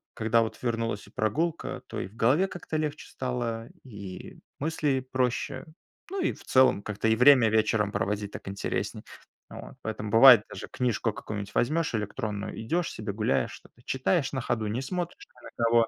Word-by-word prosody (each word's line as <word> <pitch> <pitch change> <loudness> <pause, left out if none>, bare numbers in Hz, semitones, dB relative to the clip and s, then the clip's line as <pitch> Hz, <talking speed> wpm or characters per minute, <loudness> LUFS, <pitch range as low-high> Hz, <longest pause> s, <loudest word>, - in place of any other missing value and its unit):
когда 115 +1 +3
вот 110 - -6
вернулась 115 -4 -2
и - - -17
прогулка, 155 +11 -1
то - - -5
и - - -3
в 105 - -19
голове 140 +13 +3
как-то 175 -4 -5
легче 150 -1 -3
стало, 120 -3 -3
и 100 -7 -9 0.2
мысли 150 -3 0
проще. 130 0 -1 0.5
Ну, 390 -1 -2
и - - +1
в - - -15
целом, 130 -6 +4
как-то 105 +1 -2
и 110 - +4
время 125 -2 +7
вечером 110 -1 +2
проводить 100 0 -1
так - - -9
интереснее 100 0 -3 0.5
вот. - - -10
Поэтому, 105 -1 -4
бывает, 115 -2 +9
даже - - -7
книжку 120 -2 0
какую-нибудь 105 -1 -6
возьмёшь 155 +1 +1
электронную, 105 -1 -4
идёшь 165 +9 -1
себе, 105 -2 -5
гуляешь, 110 +1 0
что-то 120 - -16
читаешь 135 +3 +1
на 130 - -1
ходу, 110 -3 -1
не 115 +5 -2
смотришь 175 +4 -4
ни - - -23
на - - -10
кого. 115 -1 +4
115 Hz, 175 wpm, -28 LUFS, 105-135 Hz, 0.5 s, бывает